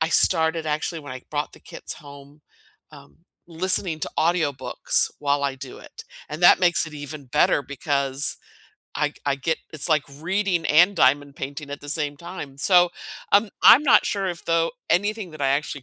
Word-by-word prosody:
I 160 - +1
started 160 -2 +2
actually 155 +2 -2
when 145 -3 -9
I 130 -1 -9
brought 150 0 -3
the - - -16
kits - - -8
home, 145 0 -14 0.5
um, 140 -1 -16 0.3
listening 170 -1 -1
to - - -4
audiobooks 160 -5 +1
while 140 0 0
I 140 -1 -1
do 130 -1 -9
it, - - -13 0.3
and 155 +4 -6
that - - +7
makes 175 -2 +2
it 155 - -10
even 145 -1 -8
better 150 +3 +2
because 140 0 -1 0.6
I 150 - 0
g - - -26
I 140 -1 +1
get 160 +4 -2
it's 155 0 -2
like 155 -3 +3
reading 175 +4 -2
and 175 +6 +4
diamond 140 +1 +2
painting 140 +2 -7
at 145 - -6
the 145 - -11
same 145 -1 -2
time. 150 -4 -9
So, 175 +2 +4 0.4
um, 205 +1 +4
I'm 265 - +8
not 255 - +5
sure 195 -2 -1
if, 175 -2 -6
though, 165 +2 +1 0.2
anything 205 0 0
that 155 - -11
I 135 - +2
actually 140 0 -2
150 Hz, 185 wpm, -23 LUFS, 140-175 Hz, 0.6 s, I'm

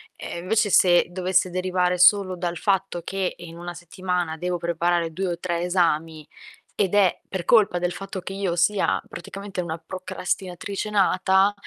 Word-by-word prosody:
Eh 170 - -7
invece 210 +2 +2
se 175 -2 +5
dovesse 185 0 +1
derivare 180 0 0
solo 185 0 +5
dal 175 -1 -3
fatto 195 -3 0
che 195 -1 -2
in 170 -1 -10
1 175 0 -6
settimana 175 -1 -3
devo 180 +1 -2
preparare 170 0 0
2 190 +3 -3
o 170 0 -3
3 175 -2 -2
esami, 165 -3 0 0.5
ed 200 -2 +1
è 195 -4 +3
per 185 -3 -4
colpa 200 -6 +4
del 175 0 -1
fatto 195 0 -6
che 190 - -7
io 195 -3 -1
sia 200 +4 +2
praticamente 195 +2 -6
una 165 -1 -4
procrastinatrice 185 +3 -4
nata, 190 0 +3
180 Hz, 160 wpm, -24 LUFS, 175-190 Hz, 0.5 s, se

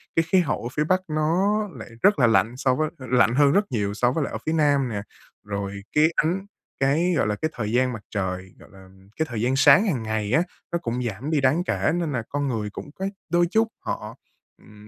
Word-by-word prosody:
cái 165 - +4
khí 185 +3 +4
hậu 165 -9 -1
ở 120 - -3
phía 150 - +1
Bắc 185 +4 +1
nó 170 +7 +1
lại 120 -4 -9
rất 205 -6 +4
là 120 - +5
lạnh 115 +2 +2
so 130 -1 +2
với 155 +2 0
lạnh 125 -3 +2
hơn 140 0 +5
rất 200 +6 +3
nhiều 100 -4 -1
so 120 +3 +1
với 155 +3 -1
lại - - -4
ở - - -2
phía 160 - 0
Nam 145 -4 +2
nè, 105 -3 -3 0.4
rồi 100 -1 -4
cái 150 - +5
ánh 180 +5 0 0.3
cái, 155 +7 +2
gọi - - +2
là, 105 - 0
cái 155 +9 -2
thời 110 -3 -3
gian 125 +1 +2
mặt 110 - -7
trời, 95 -2 -3
gọi - - -16
làm, 95 0 -17
cái 160 - +2
thời 115 -3 -3
gian 125 +3 +1
sáng 145 +10 +6
hàng 135 - -1
ngày 110 -1 -2
á, 160 - +4 0.3
nó 170 - +1
cũng 120 -3 -3
giảm 120 +6 -4
đi 150 -3 +2
đáng 140 +6 +2
kể 180 - 0
nên 170 -3 -1
là 120 -4 -2
con 145 0 -1
người 110 -5 -2
cũng 105 - -9
có 190 - -4 0.3
đôi 175 0 +4
chút 220 +2 +3 0.2
họ, - - -4 0.5
ừm, 105 0 -16
130 Hz, 240 wpm, -24 LUFS, 110-160 Hz, 0.5 s, sáng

